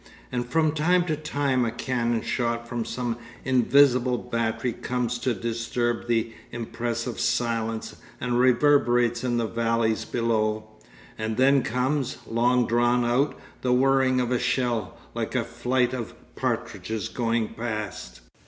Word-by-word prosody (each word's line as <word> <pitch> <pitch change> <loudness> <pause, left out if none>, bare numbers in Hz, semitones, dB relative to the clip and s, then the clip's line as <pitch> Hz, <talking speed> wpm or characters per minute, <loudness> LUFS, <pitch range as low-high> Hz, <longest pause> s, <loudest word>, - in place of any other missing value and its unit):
And 120 -1 -2
from 155 +1 +3
time 175 +4 +2
to 160 -3 0
time 140 -4 0
a 115 - +1
cannon 120 -1 -1
shot 120 -1 -1
from 120 -1 -3
some 120 -2 -3 0.3
invisible 130 -1 +4
battery 115 0 -2
comes 125 0 -2
to 125 -1 0
disturb 115 +2 -2
the 115 -1 0 0.2
impressive 120 0 -3
silence 115 -2 -1 0.2
and 120 -1 0
reverberates 120 -2 +3
in 120 -2 0
the 115 - +1
valleys 115 0 0
below; 110 -2 0 0.6
and 110 0 -2
then 135 +1 +5
comes, 130 +2 -1
long 120 +2 +2
drawn 120 +1 +2
out, 125 +5 +1 0.2
the 125 -1 +2
whirring 130 0 +3
of 125 -1 0
a 125 - +2
shell, 120 -4 -1 0.2
like 115 +1 -3
a 125 - +2
flight 125 +2 0
of 120 -3 -5 0.2
partridges 110 0 -2
going 115 -1 -1
past. 105 - -5
120 Hz, 135 wpm, -26 LUFS, 115-125 Hz, 0.6 s, then